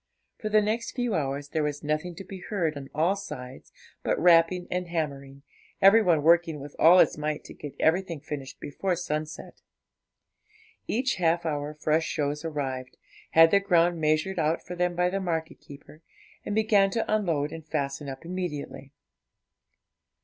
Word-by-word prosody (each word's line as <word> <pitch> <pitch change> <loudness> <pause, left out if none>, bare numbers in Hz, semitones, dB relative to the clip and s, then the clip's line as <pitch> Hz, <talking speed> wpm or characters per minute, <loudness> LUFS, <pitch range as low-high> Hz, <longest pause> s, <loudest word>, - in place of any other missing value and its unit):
For 215 - -3
the 215 0 +4
next 220 +3 -2
few 245 -3 -1
hours 145 -3 -2
there 160 - -1
was 150 0 -3
nothing 155 +4 -2
to 195 - -8
be 190 0 -9
heard 175 -6 -2
on 140 -1 -8
all 165 +6 +1
sides 125 -10 -9 0.3
but - - 0
rapping 175 +1 +4
and 180 0 -2
hammering, 140 -4 -4 0.4
every 200 +3 +7
one 170 -7 +2
working 165 -1 +3
with 145 +1 -10
all 170 +3 +7
his 165 - +4
might 150 0 -2
to - - -11
get 145 -2 -9
everything 170 -1 +1
finished 140 -2 -7
before 180 +6 -2
sunset. 155 -3 -5 1.3
Each 260 +3 0
half 170 -1 +1
hour 150 -1 -3
fresh 155 +1 0
shows 145 -1 -2
arrived, 135 -5 -4 0.4
had 165 0 +7
their 200 - +5
ground 175 -3 +2
measured 155 +5 +1
out 160 +1 0
for - - -6
them 175 0 0
by 180 +1 +1
the 195 - -1
market 165 -3 -3
keeper, 145 +2 -14 0.4
and 205 - -3
began 215 -2 +4
to 225 +3 -1
unload 165 -9 0
and 165 -1 -8
fasten 140 -2 -3
up 135 +4 -8
immediately. 165 -6 -5
165 Hz, 165 wpm, -27 LUFS, 150-180 Hz, 1.3 s, every